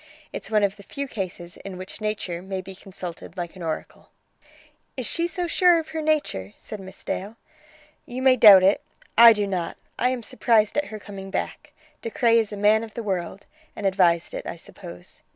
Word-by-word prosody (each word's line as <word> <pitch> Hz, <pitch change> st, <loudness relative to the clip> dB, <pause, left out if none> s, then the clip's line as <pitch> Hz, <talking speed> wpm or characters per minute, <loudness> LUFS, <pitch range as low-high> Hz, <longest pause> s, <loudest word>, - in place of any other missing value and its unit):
It's -, -, -6 dB
one 215 Hz, -1 st, +3 dB
of 200 Hz, 0 st, 0 dB
the -, -, -12 dB
few 280 Hz, +7 st, -5 dB
cases 180 Hz, -6 st, -6 dB
in 190 Hz, -2 st, -8 dB
which 185 Hz, +4 st, -8 dB
nature 205 Hz, -5 st, -3 dB
may 190 Hz, 0 st, -4 dB
be 190 Hz, +1 st, -8 dB
consulted 185 Hz, -2 st, -9 dB
like 175 Hz, 0 st, -5 dB
an 185 Hz, -, -11 dB
oracle." 160 Hz, -2 st, -5 dB, 0.9 s
"Is 255 Hz, -, -3 dB
she 335 Hz, +9 st, 0 dB
so 350 Hz, +1 st, -3 dB
sure 350 Hz, 0 st, +4 dB
of 320 Hz, -1 st, -4 dB
her 320 Hz, -, -3 dB
nature?" 295 Hz, -, -1 dB
said 215 Hz, -, -8 dB
Miss 190 Hz, 0 st, -11 dB
Dale. 205 Hz, +4 st, -4 dB, 0.7 s
"You 255 Hz, +2 st, -5 dB
may 260 Hz, -1 st, +6 dB
doubt 205 Hz, -6 st, +9 dB
it; 195 Hz, +2 st, +4 dB, 0.3 s
I 235 Hz, 0 st, +10 dB
do 210 Hz, -2 st, +1 dB
not. 185 Hz, -4 st, -3 dB, 0.2 s
I 250 Hz, -, +3 dB
am 255 Hz, -2 st, -3 dB
surprised 215 Hz, -1 st, +2 dB
at 295 Hz, -, +1 dB
her 215 Hz, -, -7 dB
coming 195 Hz, -2 st, -9 dB
back. 295 Hz, +8 st, -4 dB, 0.3 s
De 230 Hz, -, -4 dB
Craye 230 Hz, +1 st, +3 dB
is 220 Hz, -2 st, -1 dB
a 205 Hz, -, -5 dB
man 210 Hz, +2 st, +4 dB
of 220 Hz, -2 st, -10 dB
the 235 Hz, -, -4 dB
world, 190 Hz, -1 st, -3 dB, 0.3 s
and 205 Hz, -, -6 dB
advised 180 Hz, -3 st, +2 dB
it, -, -, -5 dB
I -, -, -4 dB
suppose. -, -, -12 dB
210 Hz, 205 wpm, -24 LUFS, 190-240 Hz, 0.9 s, I